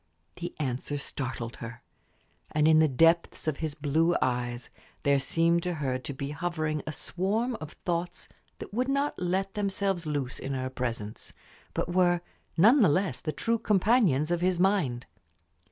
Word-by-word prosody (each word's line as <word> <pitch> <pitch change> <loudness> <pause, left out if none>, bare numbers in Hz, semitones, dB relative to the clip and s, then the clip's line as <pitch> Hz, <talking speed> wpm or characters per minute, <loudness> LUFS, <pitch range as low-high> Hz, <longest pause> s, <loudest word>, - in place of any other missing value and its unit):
The 175 0 -5
answer 135 +1 -2
startled 130 -4 -4
her. 115 0 -8 0.7
And 155 0 +2
in 160 0 +6
the 160 - +5
depths 165 +5 +2
of 155 -3 0
his 155 -2 -3
blue 160 +4 +2
eyes 120 -1 -2 0.3
there 140 -1 +4
seemed 165 +5 +2
to 180 0 -2
her 130 -4 -1
to 130 - -6
be 140 +1 -5
hovering 155 -1 -2
a - - -1
swarm 210 - -1
of 155 - -7
thoughts 175 0 -2 0.3
that - - -9
would 250 +4 0
not 280 +1 +1
let 190 +2 -1
themselves 195 -4 -1
loose 140 -4 -2
in 135 0 -3
her 130 0 -3
presence, 115 -5 -4 0.4
but 175 - -1
were 175 -1 +3 0.4
none 230 - +7
the 200 - +6
less 145 -5 0
the 155 - -2
true 230 +7 0
companions 195 - +3
of 175 0 +1
his 180 -1 +1
mind. 175 -11 +1
160 Hz, 165 wpm, -28 LUFS, 135-185 Hz, 0.7 s, none